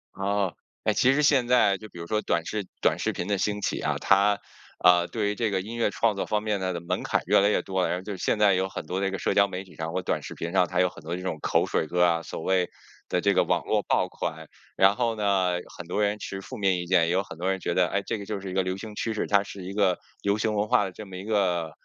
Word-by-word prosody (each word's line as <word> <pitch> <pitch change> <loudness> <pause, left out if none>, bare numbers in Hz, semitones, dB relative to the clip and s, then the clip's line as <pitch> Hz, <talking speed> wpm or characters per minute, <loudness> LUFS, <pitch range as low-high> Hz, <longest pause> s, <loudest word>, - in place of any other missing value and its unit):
哦， 100 -1 -1 0.3
哎， - - +2
其 130 - +4
实 150 +2 +2
现 135 -4 +4
在 120 -6 +4
就 110 +2 -11
比 - - -14
如 85 - -6
说 105 +5 0
短 85 -4 0
视 105 +1 -3
短 - - +2
视 - - 0
频 85 - -4
的 100 -1 +1
兴 105 +1 -1
起 - - -1
啊， - - -1
它， 100 +1 +3 0.4
呃， 90 -1 +6
对 105 -3 -1
于 105 - -2
这 115 -1 0
个 95 -2 0
音 110 +5 -6
乐 120 - +1
创 110 +1 +1
作 100 - -3
方 105 0 0
面 105 -2 0
它 95 -1 -1
的 85 - -3
门 85 - -2
槛 - - 0
越 - - +5
来 100 +1 +4
越 - - +1
多 95 -1 -1
了， - - +1
然 90 - 0
后 90 - -8
就 100 0 -5
现 95 - 0
在 105 -2 +5
有 95 +1 0
很 - - -6
多 90 +4 -3
这 95 - +1
个 95 - -3
社 - - 0
交 100 0 +5
媒 95 -1 -5
体 95 - -17
上 80 0 -4
或 95 +2 -2
短 - - -1
视 - - -8
频 85 - -4
上， 90 -1 +3
它 90 - +1
有 90 - +3
很 80 - -14
多 85 +2 -3
这 90 - -6
种 80 -4 -3
口 - - +2
水 80 - -1
歌 90 +2 +2
啊， 85 -1 +3
所 - - -6
谓 95 0 +1 0.4
的 - - +1
这 - - +3
个 - - +4
网 - - 0
络 - - +1
爆 - - +1
款。 80 -1 -5 0.3
然 95 +1 +5
后 115 0 0
呢， 100 -4 +1 0.2
很 90 - -9
多 105 +4 0
人 105 +1 0
持 95 -1 -6
负 130 +6 -8
面 95 -3 +2
意 90 - -4
见， 85 -2 +3
也 - - 0
有 95 +2 +2
很 80 - -11
多 90 +2 0
人 95 0 0
觉 85 - -2
得 90 0 +3
哎， 100 +2 -1
这 115 - -2
个 100 - -7
就 105 -1 -4
是 95 -1 -6
一 - - -6
个 95 - +2
流 95 0 -2
行 105 +2 -8
趋 110 +1 -3
势， - - -1
它 100 -1 +3
是 100 -1 -8
一 95 +2 -6
个 100 -3 +2 0.2
流 100 +1 +1
行 110 0 0
文 105 0 0
化 105 - +4
的 95 - -4
这 105 +4 -9
么 95 -1 -8
一 95 - -7
个 90 -7 0
95 Hz, 330 characters per minute, -26 LUFS, 90-105 Hz, 0.4 s, 呃